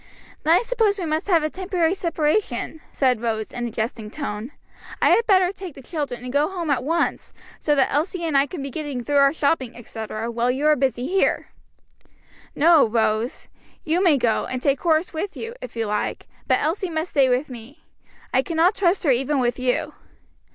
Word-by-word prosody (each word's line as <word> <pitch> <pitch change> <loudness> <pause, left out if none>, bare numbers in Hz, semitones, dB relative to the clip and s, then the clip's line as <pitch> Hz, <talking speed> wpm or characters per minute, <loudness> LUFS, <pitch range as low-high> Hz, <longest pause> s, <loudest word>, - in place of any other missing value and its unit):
"Then 325 +3 +5
I - - +1
suppose 450 -4 +1
we 365 - -3
must 315 +4 -1
have 340 -5 +3
a 310 - 0
temporary 365 -3 0
separation," 320 - -1
said 255 -4 +1
Rose, 220 -2 -2
in 240 0 -3
a - - -4
jesting 220 -1 -4
tone; 225 -2 -5 0.5
"I - - +4
had 465 - +3
better 375 -3 +4
take 380 -5 -9
the 270 - -12
children 280 -6 -4
and 250 0 -6
go 290 +3 +2
home 345 -5 -3
at 255 -3 +1
once, 330 +4 -1 0.3
so 295 - +1
that 270 - +2
Elsie 340 +4 -1
and 315 -3 -1
I 275 +1 +4
can 295 -2 -6
be 275 - -5
getting 285 -4 -4
through 290 +3 0
our 275 0 +5
shopping, 280 -5 -1
etc., 225 -1 -5
while 235 +1 0
you 265 +4 -1
are 305 0 +5
busy 260 -2 0
here." 380 +6 +1 1.1
"No, 320 -3 +5
Rose; 220 +2 -1 0.4
you 340 +4 +1
may 325 -6 +5
go, 235 -3 +1
and 255 - -3
take 275 +1 +1
Horace 325 +1 +1
with 370 +5 -4
you, 460 +1 -6
if - - -8
you 225 -1 -1
like; 210 0 -2 0.2
but - - +4
Elsie 355 +4 -1
must 320 +1 -3
stay 275 -3 +4
with 255 +4 +1
me. 250 +3 -12 0.5
I 260 - +4
cannot 335 +6 +2
trust 380 -1 +1
her 290 - +3
even 270 +3 +1
with 245 0 0
you!" 255 +4 -1
290 Hz, 200 wpm, -23 LUFS, 245-335 Hz, 1.1 s, Then